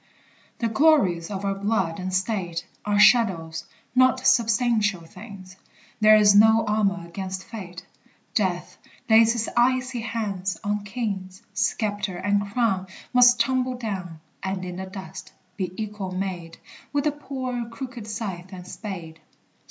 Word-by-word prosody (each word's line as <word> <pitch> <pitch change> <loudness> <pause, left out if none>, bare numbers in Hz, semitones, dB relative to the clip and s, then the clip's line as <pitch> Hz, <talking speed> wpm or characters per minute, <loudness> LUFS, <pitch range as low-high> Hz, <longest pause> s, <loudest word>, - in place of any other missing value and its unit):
] - - -32
The 230 - +2
glories 225 - +3
of 200 -1 -4
our 195 - +1
blood 195 -4 -1
and 185 0 -3
state 185 -3 -2 0.2
Are 205 0 +1
shadows, 190 -7 +4 0.3
not 255 0 +3
substantial 225 -4 +3
things; 190 0 -12 0.4
There 215 0 +7
is 210 -1 +6
no 220 +2 +6
armor 200 -4 0
against 190 +2 -5
fate; 190 -6 -9 0.5
Death - - -1 0.3
lays 225 0 +6
his 230 -2 -2
icy 255 +1 +2
hand 205 -5 -3
on 205 0 -1
kings: 195 -3 -4
Sceptre 205 -3 -1
and 200 +2 0
crown 200 -5 0 0.3
Must 245 -1 +6
tumble 255 +1 +1
down. 190 -8 -5 0.2
And 190 -1 -3
in 180 0 -6
the 190 0 -5
dust 190 -1 -9 0.2
be 185 -3 -3
equal 210 -3 -4
made 185 -3 -4 0.3
With 285 -1 0
the 300 - +2
poor 255 -5 -5
crooked 240 -2 -7
scythe 195 -4 -5
and 180 -2 -9
spade. 170 -7 -7
205 Hz, 140 wpm, -24 LUFS, 185-230 Hz, 0.5 s, There